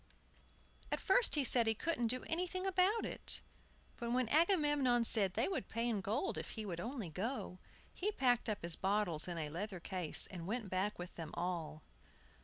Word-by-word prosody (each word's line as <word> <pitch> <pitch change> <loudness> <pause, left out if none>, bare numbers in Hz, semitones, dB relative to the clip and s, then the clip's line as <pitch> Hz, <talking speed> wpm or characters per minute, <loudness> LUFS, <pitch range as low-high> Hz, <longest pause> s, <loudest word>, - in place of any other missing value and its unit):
At - - 0
first 445 +1 +4
he 290 - +2
said 235 -2 +6
he 220 - +2
couldn't 245 -2 -1
do 255 +3 0
anything 365 +3 -2
about 385 +4 +2
it; - - +3 0.6
but 235 -1 -4
when 250 -2 +1
Agamemnon 295 -7 +3
said 200 -5 +4
they 230 - +1
would 380 - -3
pay 230 +1 -1
in 220 -4 0
gold 225 - -1
if - - -6
he 220 - -4
would 175 -4 -4
only 230 - -4
go, 195 - -4 0.3
he 410 +3 -1
packed 245 - +1
up 210 - -3
his 170 -1 -2
bottles 190 -5 0
in 175 -1 -4
a 155 -2 -3
leather 185 +4 -5
case, 175 -2 -3
and 175 -2 -7
went 220 -2 -3
back 190 +3 -1
with 175 +1 -7
them 165 -2 -7
all. 170 -3 -3
225 Hz, 190 wpm, -36 LUFS, 185-280 Hz, 0.6 s, said